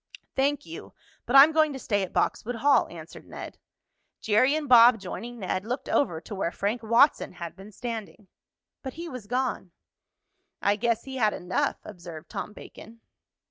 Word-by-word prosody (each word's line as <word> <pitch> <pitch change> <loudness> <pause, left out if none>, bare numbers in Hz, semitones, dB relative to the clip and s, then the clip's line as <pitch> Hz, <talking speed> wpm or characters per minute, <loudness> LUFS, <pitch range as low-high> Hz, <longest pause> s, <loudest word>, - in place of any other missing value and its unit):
"Thank 280 +1 0
you, 350 +6 -10 0.3
but 245 - 0
I'm 280 +3 +9
going 310 -2 +2
to - - -5
stay 205 -6 -1
at 190 - -4
Boxwood 245 +2 -1
Hall," 275 +5 +3
answered 165 -1 -11
Ned. - - -9 0.6
Jerry 255 +7 +3
and 310 -2 -3
Bob, 240 -1 +7
joining 240 +5 -7
Ned, 185 -2 -3
looked 250 +5 -4
over 175 - +1
to 205 - -10
where 190 -4 -2
Frank 210 +6 -2
Watson 235 +3 +3
had 170 -2 -8
been 195 +2 -12
standing. 220 -2 -7 0.5
But 265 - -6
he 340 +2 -7
was 255 -9 -8
gone. 250 -5 -2 0.9
"I 200 - +2
guess 230 +1 0
he 265 -1 -7
had 215 -4 +2
enough," 180 +1 -1
observed 170 -5 -10
Tom - - -5
Bacon. 230 +2 -13
230 Hz, 170 wpm, -26 LUFS, 200-265 Hz, 0.9 s, I'm